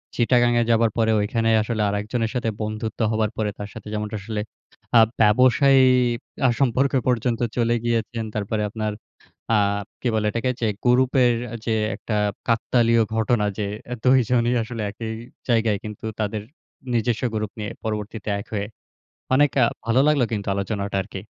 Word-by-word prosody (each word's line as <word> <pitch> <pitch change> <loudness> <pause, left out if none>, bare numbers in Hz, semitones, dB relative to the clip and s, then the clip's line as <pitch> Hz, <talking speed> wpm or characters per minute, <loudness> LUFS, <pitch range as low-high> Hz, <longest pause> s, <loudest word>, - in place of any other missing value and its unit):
চিটাগাঙে 120 0 +3
যাবার 115 -1 +3
পরে 110 -1 +3
ঐখানে 115 +2 0
আসলে 110 0 -2
আরেকজনের 110 +3 -2
সাথে 115 -2 0
বন্ধুত্ব 110 +1 -4
হবার 110 -1 0
পরে, 105 -1 0
তার 105 0 -6
সাথে - - -10
যেমনটা 105 0 -3
আসলে 105 +1 -3 0.6
আ - - +9 0.2
ব্যবসায়ী 130 +5 +5 0.7
আ - - +4
সম্পর্কে 135 +1 +2
পর্যন্ত 120 -1 +1 0.2
চলে 120 0 +2
গিয়েছেন। 115 -1 -1
তারপরে 105 +1 -1
আপনার 110 0 -3 0.7
আ - - +4 0.4
কি 125 - -1
বলে 110 -1 +1
এটাকে? 115 +3 -1
যে, 115 - +1 0.2
গ্রুপের 125 0 +4 0.3
যে, 115 - +1 0.2
একটা 105 - -3 0.3
কাকতালীয় 115 0 +3
ঘটনা 110 -1 +1
যে, 105 - -1 0.4
২ 130 +1 +6
জনই 120 -1 +2
আসলে 115 -1 -5
একই 110 +1 -6 0.4
জায়গায়, 115 -3 +2
কিন্তু 105 0 -7
তাদের 105 0 -2 0.5
নিজস্ব 120 0 0
গ্রুপ 105 -1 -2
নিয়ে 105 - -4
পরবর্তীতে 105 0 -4
এক 105 - -10
হয়ে 100 -1 -1 0.7
অনেক 145 0 +4
আ - - +6 0.2
ভালো 115 +3 +3
লাগলো 145 -5 +3
কিন্তু 100 -2 -3
আলোচনাটা 100 0 -2
আরকি। 95 - -8
115 Hz, 150 wpm, -23 LUFS, 105-120 Hz, 0.7 s, আ